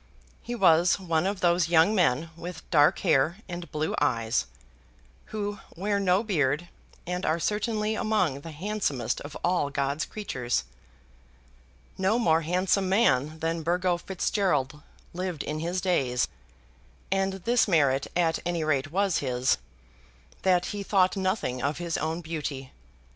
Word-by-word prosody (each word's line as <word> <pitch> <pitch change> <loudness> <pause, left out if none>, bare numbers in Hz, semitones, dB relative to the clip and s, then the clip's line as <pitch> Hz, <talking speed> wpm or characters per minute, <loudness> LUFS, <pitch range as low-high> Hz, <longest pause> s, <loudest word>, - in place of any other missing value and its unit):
He 240 - -5
was 175 -3 +4
one 170 -1 0
of 195 -1 -3
those 175 -1 +3
young 170 +4 +5
men 165 -4 +2
with 170 0 -8
dark 145 -4 +5
hair 150 +7 +2
and 175 -1 -7
blue 155 +1 -1
eyes, 115 - +1 0.8
who 205 -1 -4 0.2
wear 200 +3 0
no 190 +1 +2
beard, 165 - 0 0.4
and 180 +1 -3
are 160 +2 +1
certainly 215 +3 0
among 210 -11 0
the 165 - -8
handsomest 165 - -2
of 145 +1 -8
all 175 -5 +1
God's 140 +2 -1
creatures. 125 - -2 1.4
No 190 +4 +2
more 165 -9 +3
handsome 185 +3 +1
man 155 - +2
than 165 +1 -1
Burgo 175 +2 +1
Fitzgerald 170 -6 -1 0.3
lived 180 -3 -3
in 155 +1 -3
his 175 +3 -2
days; 135 -9 +1 0.8
and 195 0 +1
this 230 +6 +1
merit 140 -7 +2
at 165 -2 +2
any 175 -2 -1
rate 145 -2 0
was 195 -1 +1
his, 125 - +1 0.8
that 180 -2 +3
he 205 - -4
thought 190 -2 +2
nothing 185 - -1
of 140 +3 -1
his 170 -1 -3
own 160 +2 -2
beauty. 150 -5 -5
170 Hz, 140 wpm, -27 LUFS, 150-190 Hz, 1.4 s, young